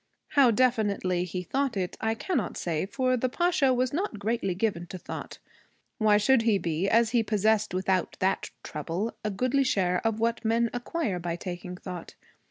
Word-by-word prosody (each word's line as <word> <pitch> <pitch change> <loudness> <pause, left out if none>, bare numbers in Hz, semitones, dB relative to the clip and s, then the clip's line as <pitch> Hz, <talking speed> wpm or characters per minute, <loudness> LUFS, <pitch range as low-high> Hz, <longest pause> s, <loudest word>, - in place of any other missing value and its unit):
How 275 -4 +5
definitely 210 -7 +1
he 180 +1 -4
thought 270 +2 -1
it, 180 -2 -2
I 220 0 +1
cannot 360 +10 -2
say, 170 +1 -1
for 255 +3 +1
the 255 +1 0
Pasha 345 -2 +2
was 255 +1 +1
not 335 - -2
greatly 205 -3 -1
given 185 -4 -1
to 185 - -7
thought. - - -7 0.6
Why 215 -2 +5
should 230 +4 +4
he 225 -3 +3
be, 170 +1 -1
as 230 0 +4
he 240 -1 +3
possessed 215 0 +1
without 185 0 0
that 190 +1 0
trouble 165 +9 -3
a 215 - 0
goodly 255 +7 +1
share 180 -7 +1
of 225 -1 0
what 230 +1 0
men 230 +1 +2
acquire 245 - -2
by 170 -1 -3
taking 180 0 -6
thought? 180 -2 -8
215 Hz, 180 wpm, -28 LUFS, 185-245 Hz, 0.6 s, How